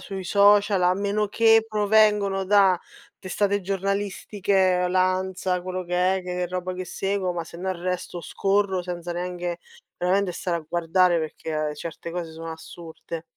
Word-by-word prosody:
sui 190 0 -6
social, 200 0 +4
a 180 0 +4
meno 200 +2 -1
che 225 +1 +5
provengono 210 -2 +3
da 190 -2 +4 0.4
testate 200 +2 -1
giornalistiche, 195 -1 0
l'ANSA, 185 0 0
quello 185 0 -4
che 180 +2 +1
è, 190 - -4
che 180 0 -3
roba 185 +1 -4
che 185 0 -5
seguo, 195 0 -2
ma 170 -1 -4
sennò 180 +3 -4 0.5
scorro 195 0 0
senza 175 -1 -5
neanche 175 0 -4 0.4
veramente 185 +1 +1
stare 175 -1 -2
a - - -7
guardare, 175 +1 +2
perché 155 -1 -3
certe 170 +2 -7
cose 170 -1 -5
sono 165 0 -7
assurde. 160 0 -9
185 Hz, 140 wpm, -24 LUFS, 175-200 Hz, 0.5 s, che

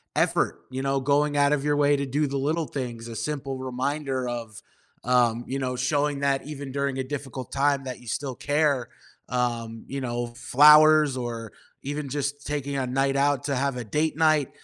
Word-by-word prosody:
effort; - - +1
you 130 +1 -4
know, 135 0 0
going 145 +2 +1
out 145 +1 +4
of 140 -1 0
your 145 0 +2
way 145 0 +4
to 140 0 -1
do 145 +3 0
the 140 0 -2
little 155 +3 -1
things, 120 -4 -5
a 115 - -7
simple 135 +2 -3
reminder 130 0 -2
of, 115 -3 -6 0.4
um 120 -1 +2
you 135 +1 -2
know, 125 -1 -2
showing 140 +2 0
that 140 -1 +1
even 140 -3 -6
during 140 -1 -1
a - - 0
difficult 135 -2 -6
time 140 0 +1
that 130 -2 -6
you 125 - -15
still 130 +2 -3
care, 145 -3 +1 0.4
um, 115 -2 -2
you 135 0 -4
know, 120 -1 -2
flowers 150 +2 +6
or 115 -3 -5 0.3
even 145 0 -4
just 140 +1 -3
taking 140 -1 -3
a 130 -2 -1
night 135 +2 +1
out 140 -1 +2
to 140 -2 0
have 135 0 -1
a 125 - -4
date 150 +8 -1
night. 155 -4 +3
135 Hz, 195 wpm, -25 LUFS, 125-145 Hz, 0.4 s, flowers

